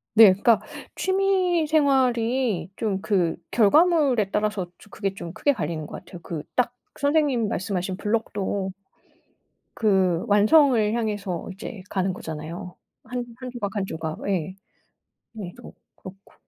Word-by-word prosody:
네. 225 Hz, -, +10 dB
그러니까 215 Hz, +4 st, +3 dB, 0.4 s
취미 375 Hz, -4 st, +1 dB
생활이 255 Hz, -, +2 dB
좀 200 Hz, -4 st, -2 dB
그 180 Hz, -6 st, +1 dB, 0.2 s
결과물에 265 Hz, -, +4 dB
따라서 210 Hz, -3 st, 0 dB
좀 210 Hz, -, -18 dB
그게 195 Hz, -3 st, -2 dB
좀 170 Hz, -4 st, -7 dB
크게 285 Hz, -, +2 dB
갈리는 165 Hz, -8 st, -3 dB
것 -, -, -9 dB
같아요. 175 Hz, -, -10 dB
그 160 Hz, -4 st, -5 dB
딱 245 Hz, -1 st, +1 dB, 0.3 s
선생님 285 Hz, -5 st, +2 dB
말씀하신 190 Hz, -2 st, -2 dB
블록도 205 Hz, -3 st, -1 dB, 1.1 s
그 190 Hz, -4 st, +2 dB
완성을 215 Hz, +1 st, +5 dB
향해서 205 Hz, -7 st, -3 dB
이제 195 Hz, +1 st, -8 dB
가는 190 Hz, -1 st, 0 dB
거잖아요. 165 Hz, +1 st, -7 dB, 0.3 s
한 245 Hz, +1 st, -3 dB, 0.2 s
한 255 Hz, -1 st, -6 dB
조각, 210 Hz, -4 st, -4 dB
1 200 Hz, -2 st, 0 dB
조각 160 Hz, -3 st, -5 dB
예. 185 Hz, 0 st, -1 dB, 0.8 s
얘도 180 Hz, -3 st, -9 dB, 0.2 s
그렇고. 190 Hz, +1 st, -13 dB
210 Hz, 260 characters per minute, -24 LUFS, 185-250 Hz, 1.1 s, 네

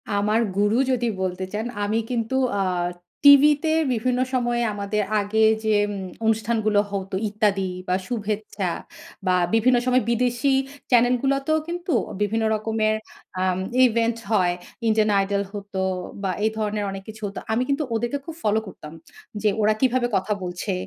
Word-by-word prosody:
আমার 210 Hz, +2 st, +2 dB, 0.2 s
গুরু 205 Hz, +3 st, +3 dB
যদি 245 Hz, -2 st, 0 dB, 0.2 s
বলতে 185 Hz, 0 st, -2 dB
চান, 215 Hz, +2 st, -2 dB, 0.2 s
আমি 210 Hz, +2 st, 0 dB
কিন্তু 235 Hz, 0 st, -1 dB, 0.2 s
আ -, -, +2 dB, 0.6 s
টিভিতে 290 Hz, +2 st, +7 dB, 0.2 s
বিভিন্ন 250 Hz, +2 st, 0 dB
সময়ে 240 Hz, -1 st, +1 dB
আমাদের 205 Hz, +1 st, -1 dB, 0.2 s
আগে 205 Hz, +2 st, -1 dB, 0.3 s
যে 220 Hz, -, +3 dB, 0.5 s
অনুষ্ঠানগুলো 220 Hz, -1 st, +2 dB
হতো 195 Hz, -1 st, -3 dB
ইত্যাদি 200 Hz, -2 st, 0 dB, 0.2 s
বা 180 Hz, -, +2 dB
শুভেচ্ছা, 210 Hz, -4 st, -3 dB, 0.6 s
বা 180 Hz, -, +4 dB, 0.2 s
বিভিন্ন 245 Hz, +2 st, +4 dB
সময় 255 Hz, -2 st, +3 dB
বিদেশী 245 Hz, +3 st, +1 dB, 0.4 s
চ্যানেল 245 Hz, 0 st, +5 dB
গুলোতেও 275 Hz, +3 st, +1 dB
কিন্তু 345 Hz, -1 st, -3 dB, 0.3 s
বিভিন্ন 220 Hz, +2 st, +1 dB
রকমের 215 Hz, 0 st, 0 dB, 0.5 s
আম 185 Hz, 0 st, +1 dB, 0.3 s
ইভেন্ট 230 Hz, 0 st, +1 dB
হয়। 180 Hz, -5 st, +3 dB, 0.3 s
ইন্ডিয়ান 215 Hz, -1 st, +3 dB
আইডল 200 Hz, +1 st, 0 dB
হতো 200 Hz, -2 st, -5 dB, 0.4 s
বা 190 Hz, -, 0 dB
এই -, -, +4 dB
ধরনের 210 Hz, -1 st, -1 dB
অনেক 195 Hz, 0 st, -7 dB
কিছু 220 Hz, 0 st, -10 dB
হতো। 200 Hz, -, -6 dB
আমি 245 Hz, +3 st, +1 dB
কিন্তু 280 Hz, +2 st, +1 dB
ওদেরকে 240 Hz, +5 st, -1 dB
খুব 330 Hz, -, -7 dB
ফলো 215 Hz, +1 st, +2 dB
করতাম 155 Hz, -5 st, -10 dB, 0.5 s
যে 215 Hz, -, +3 dB
ওরা 215 Hz, +1 st, +4 dB
কিভাবে 255 Hz, -1 st, +2 dB
কথা 195 Hz, +2 st, 0 dB
বলছে? 180 Hz, +2 st, -3 dB
220 Hz, 145 wpm, -23 LUFS, 205-245 Hz, 0.6 s, টিভিতে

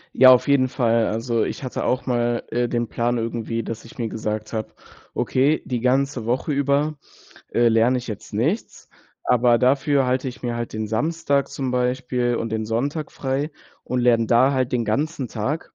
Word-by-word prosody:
Ja, 130 Hz, 0 st, +8 dB
auf 125 Hz, -, +4 dB
jeden 140 Hz, -2 st, +4 dB
Fall. 115 Hz, -3 st, +1 dB
Also 115 Hz, +1 st, 0 dB
ich -, -, -4 dB
hatte 130 Hz, -, -3 dB
auch 130 Hz, -, 0 dB
mal, 120 Hz, -2 st, 0 dB
äh, 120 Hz, 0 st, 0 dB
den 120 Hz, -1 st, -1 dB
Plan 120 Hz, +2 st, -1 dB
irgendwie, 115 Hz, 0 st, -3 dB
dass 115 Hz, 0 st, -6 dB
ich 115 Hz, -, -15 dB
mir 115 Hz, -2 st, -2 dB
gesagt 110 Hz, 0 st, -4 dB
habe: 110 Hz, -1 st, -2 dB, 0.5 s
„Okay, 140 Hz, +4 st, +1 dB
die 125 Hz, -2 st, -2 dB
ganze 130 Hz, 0 st, +1 dB
Woche 125 Hz, +5 st, 0 dB
über, 140 Hz, +2 st, +1 dB, 0.6 s
äh, 120 Hz, 0 st, +4 dB
lerne 115 Hz, +3 st, +3 dB
ich 125 Hz, -, -8 dB
jetzt 105 Hz, -3 st, -7 dB
nichts, 145 Hz, -, -2 dB, 0.4 s
aber 120 Hz, -1 st, +4 dB
dafür 135 Hz, +2 st, +2 dB
halte 130 Hz, +1 st, 0 dB
ich 125 Hz, -, -10 dB
mir 120 Hz, -1 st, -2 dB
halt 120 Hz, -1 st, -4 dB
den 110 Hz, 0 st, -3 dB
Samstag 140 Hz, +4 st, 0 dB
zum 135 Hz, -2 st, -3 dB
Beispiel 125 Hz, -1 st, 0 dB
und 115 Hz, -, -2 dB
den 110 Hz, 0 st, -1 dB
Sonntag 140 Hz, +8 st, -2 dB
frei 135 Hz, +3 st, -2 dB, 0.3 s
und 125 Hz, -, -2 dB
lerne 120 Hz, -2 st, +4 dB
da 125 Hz, +4 st, +4 dB
halt 130 Hz, -2 st, 0 dB
den 120 Hz, -2 st, 0 dB
ganzen 135 Hz, +3 st, -1 dB
Tag.“ 120 Hz, +9 st, -4 dB
125 Hz, 185 wpm, -22 LUFS, 115-135 Hz, 0.6 s, Ja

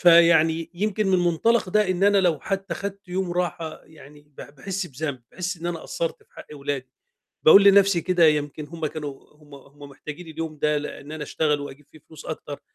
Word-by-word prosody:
فيعني 165 Hz, -1 st, +5 dB
يمكن 210 Hz, +2 st, -1 dB
من 185 Hz, -, +3 dB
مُنطلق 180 Hz, +6 st, +2 dB
ده 210 Hz, 0 st, +2 dB
إن 185 Hz, +2 st, +1 dB
أنا 205 Hz, 0 st, +5 dB
لو 175 Hz, -6 st, +2 dB
حتى 195 Hz, 0 st, -3 dB
خدت 200 Hz, -1 st, -7 dB
يوم 185 Hz, 0 st, -2 dB
راحة، 175 Hz, -2 st, -3 dB
يعني 150 Hz, -2 st, -16 dB
ب 150 Hz, -1 st, -34 dB, 0.2 s
باحس 190 Hz, +5 st, -4 dB
بذنب، 140 Hz, -3 st, -5 dB
باحِس 185 Hz, +1 st, -3 dB
إن 170 Hz, -, -5 dB
أنا 175 Hz, -1 st, -2 dB
قصَّرت 165 Hz, -, -4 dB
في -, -, -40 dB
حق -, -, -11 dB
ولادي، 140 Hz, -2 st, -4 dB, 0.6 s
باقول 195 Hz, +5 st, +9 dB
لنَفسي 200 Hz, -3 st, +6 dB
كده 180 Hz, -1 st, +2 dB
يمكن 150 Hz, 0 st, 0 dB
هُم 165 Hz, -1 st, -4 dB
كانوا 145 Hz, -3 st, -7 dB
هُم 150 Hz, -1 st, -17 dB
هُم 140 Hz, +1 st, -14 dB
محتاجين 150 Hz, +5 st, -9 dB
اليوم 160 Hz, -1 st, -6 dB
ده 150 Hz, 0 st, +1 dB
ل 150 Hz, -, -4 dB
أن 145 Hz, +2 st, -9 dB
أنا 155 Hz, -1 st, -5 dB
أشتغل 150 Hz, 0 st, 0 dB
وأجيب 145 Hz, 0 st, -9 dB
فيه 155 Hz, -, -15 dB
فلوس 160 Hz, -, -12 dB
أكتر، 145 Hz, -2 st, -6 dB
165 Hz, 200 wpm, -24 LUFS, 150-185 Hz, 0.6 s, باقول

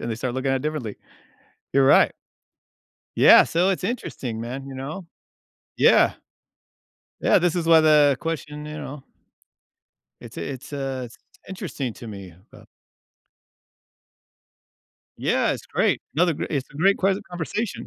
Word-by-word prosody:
and 115 Hz, -, -4 dB
they 115 Hz, -, -1 dB
start 120 Hz, +2 st, -4 dB
looking 130 Hz, +1 st, -1 dB
at 135 Hz, -, +2 dB
it 130 Hz, -, -5 dB
differently. 150 Hz, -9 st, -4 dB, 0.8 s
You're 135 Hz, -1 st, +4 dB
right. -, -, +5 dB, 1.0 s
Yeah, -, -, +8 dB
so 180 Hz, +4 st, +1 dB
it's 185 Hz, -, -2 dB
interesting, 125 Hz, -, -4 dB
man, 130 Hz, +4 st, -6 dB
you 135 Hz, -, -8 dB
know? 155 Hz, +8 st, -7 dB, 0.7 s
Yeah. -, -, +5 dB, 1.1 s
Yeah, -, -, +4 dB
this 175 Hz, -1 st, +1 dB
is 170 Hz, -2 st, -2 dB
why 165 Hz, -1 st, +7 dB
the 150 Hz, -3 st, +5 dB
question, 150 Hz, -2 st, -5 dB
you 150 Hz, 0 st, -7 dB
know 145 Hz, -2 st, -8 dB, 1.2 s
It's -, -, -12 dB
a -, -, -4 dB
it's 130 Hz, +2 st, -10 dB
a 135 Hz, -2 st, -4 dB
s 115 Hz, -, -15 dB, 0.3 s
interesting 145 Hz, -, -5 dB
to 120 Hz, -, -11 dB
me, 100 Hz, -5 st, -9 dB, 0.2 s
but -, -, -16 dB, 2.5 s
Yeah, -, -, +1 dB
it's -, -, -8 dB
great. -, -, +1 dB
Another 170 Hz, +2 st, +3 dB
gre -, -, -4 dB
it's 140 Hz, -4 st, -3 dB
a 140 Hz, -, -12 dB
great 195 Hz, +5 st, +3 dB
ques 195 Hz, +1 st, +1 dB
conversation. 180 Hz, +5 st, -4 dB
145 Hz, 150 wpm, -23 LUFS, 130-170 Hz, 2.5 s, Yeah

